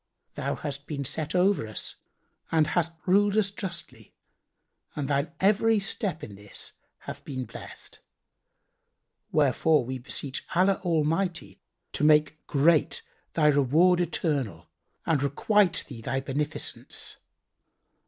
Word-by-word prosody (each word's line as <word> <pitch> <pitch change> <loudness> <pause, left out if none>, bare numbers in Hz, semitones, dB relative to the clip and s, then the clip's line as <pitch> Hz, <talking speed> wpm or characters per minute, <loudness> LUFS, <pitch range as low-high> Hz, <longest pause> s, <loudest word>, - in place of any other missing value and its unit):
Thou - - -2
hast 140 -1 -5
been 140 -3 -3
set 155 +5 -2
over 185 - +3
us 110 - -5 0.6
and 160 -2 +4
hast 170 +1 0
ruled 205 +2 +3
us 200 -2 +3
justly 170 - -7 0.8
and 145 -2 -2
thine 140 +2 0
every 215 +3 +4
step 195 -3 -2
in 105 - -7
this 100 +1 -8 0.3
hath - - -8
been 130 -2 -4
blessed; - - -10 1.3
wherefore 150 0 +3
we 130 +1 -4
beseech 135 +1 -4
Allah 190 +2 +3
Almighty 165 +1 0 0.3
to - - -2
make 155 +1 +3
great 155 +2 +3 0.3
thy 155 - +2
reward 150 +5 +4
eternal 140 - -1 0.4
and 155 -4 +2
requite 180 +7 +2
thee 125 -5 -9
thy 135 +4 -1
beneficence. 145 +2 -3
155 Hz, 120 wpm, -27 LUFS, 140-180 Hz, 1.3 s, and